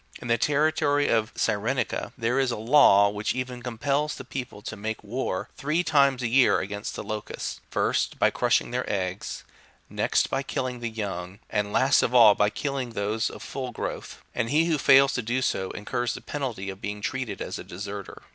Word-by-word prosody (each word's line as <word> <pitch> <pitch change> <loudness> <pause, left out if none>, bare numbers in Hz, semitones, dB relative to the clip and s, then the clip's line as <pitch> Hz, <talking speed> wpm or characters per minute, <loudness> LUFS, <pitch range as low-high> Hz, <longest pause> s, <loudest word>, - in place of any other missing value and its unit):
In 120 - -7
the 115 - +4
territory 145 +1 +2
of 110 0 +1
Cyrenaica 115 +4 0
32 - - -8
there 120 +2 +1
is 135 -2 +2
a 120 - -2
law, 110 -4 +6
which 105 +3 -2
even 125 -1 -4
compels 140 +5 -1
the - - -9
people 125 -6 -6
to 110 - -5
make 110 +1 -5
war, 105 -3 -3
three 155 +5 0
times 140 -5 +3
a - - +1
year, 125 +2 +4
against 100 +1 -5
the - - -5
locusts, 105 0 -5
first, - - 0
by - - +3
crushing - - +1
their - - -2
eggs, 95 -1 -3 0.5
next - - +1
by 135 - 0
kill 135 -1 -3
ing 125 -1 -4
the 120 -1 -3
young, 95 -4 -5
and 105 -1 0
last 135 +5 +4
of 125 - 0
all 115 -4 +9
by 105 0 +2
killing 135 0 -3
those 105 +1 -1
of - - -10
full 130 -2 -5
growth; - - -6
and 115 - -1
he 155 +3 +3
who 160 -3 +1
fails 135 0 +6
to 125 - -1
do 120 +3 -1
so, 95 -7 -1
incurs 120 +3 -3
the - - -8
penalty 120 -9 -4
of 95 - -12
being 105 0 -4
treated 120 +1 -3
as - - -5
a - - -7
deserter. 100 +1 -7
120 Hz, 205 wpm, -26 LUFS, 105-135 Hz, 0.5 s, all